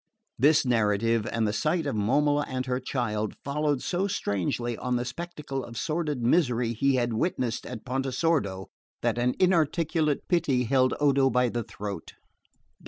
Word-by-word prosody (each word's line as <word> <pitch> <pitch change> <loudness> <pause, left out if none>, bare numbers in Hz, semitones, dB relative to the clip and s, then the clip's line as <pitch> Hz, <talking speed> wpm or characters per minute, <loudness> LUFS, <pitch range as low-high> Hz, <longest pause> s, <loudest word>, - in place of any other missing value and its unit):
This 145 +3 +5
narrative, 115 -1 +1
and 115 -1 0
the 105 - -1
sight 155 +10 0
of 140 - -2
Momola 145 +8 +2
and 130 0 -3
her 125 -1 -1
child, 110 -5 -2
followed 145 -1 0
so 190 +1 0
strangely 120 - -1
on 125 +2 -2
the 120 0 -1
spectacle 145 -2 -5
of 115 -1 -9
sordid 150 -1 -2
misery 120 -4 +2
he 135 +4 +2
had 120 -2 0
witnessed 120 -2 -1
at 120 -1 -7
Pontesordo, 130 - 0 0.4
that - - +1
an 125 +1 +1
inarticulate 165 -3 +1
pity 150 -8 +2
held 130 +1 +2
Odo 140 -2 +4
by 125 -1 +2
the 120 +1 -2
throat. 100 -5 -7
130 Hz, 155 wpm, -27 LUFS, 115-150 Hz, 0.4 s, This